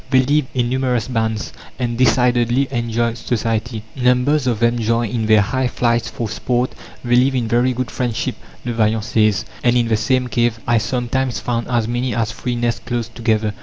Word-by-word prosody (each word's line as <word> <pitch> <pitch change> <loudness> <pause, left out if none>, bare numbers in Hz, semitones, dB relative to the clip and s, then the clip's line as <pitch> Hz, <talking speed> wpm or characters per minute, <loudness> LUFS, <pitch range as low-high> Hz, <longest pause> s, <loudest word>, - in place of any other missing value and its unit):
They 130 -1 +5
live 145 +1 +1
in 120 -2 +1
numerous 125 -2 0
bands, 110 -3 -2 0.2
and 120 -2 -2
decidedly 125 +1 +3
enjoy 115 -1 0
society; 115 -1 -2
numbers 125 +3 +2
of 120 -4 0
them 120 0 +2
join 115 -1 0
in 115 -3 -1
their 110 -1 +6
high 130 +5 0
flights 115 -2 0
for 115 - -4
sport. 120 +4 -1 0.3
"They 120 0 +3
live 130 +2 +3
in 120 -3 0
very 120 +3 +2
good 125 0 -3
friendship," 120 -3 -2 0.3
Le 120 - -2
Vaillant 110 -1 +1
says, 105 -1 +1 0.2
"and 120 0 +3
in 120 -1 +1
the 110 - +2
same 125 +3 +1
cave 120 -2 0
I 120 -1 +3
sometimes 125 +2 -1
found 120 -1 -2
as 120 -3 0
many 120 0 -1
as 115 -1 0
three 125 +2 -3
nests 120 -1 -1
close 120 -2 -3
together." 110 -2 0
120 Hz, 190 wpm, -19 LUFS, 115-125 Hz, 0.3 s, their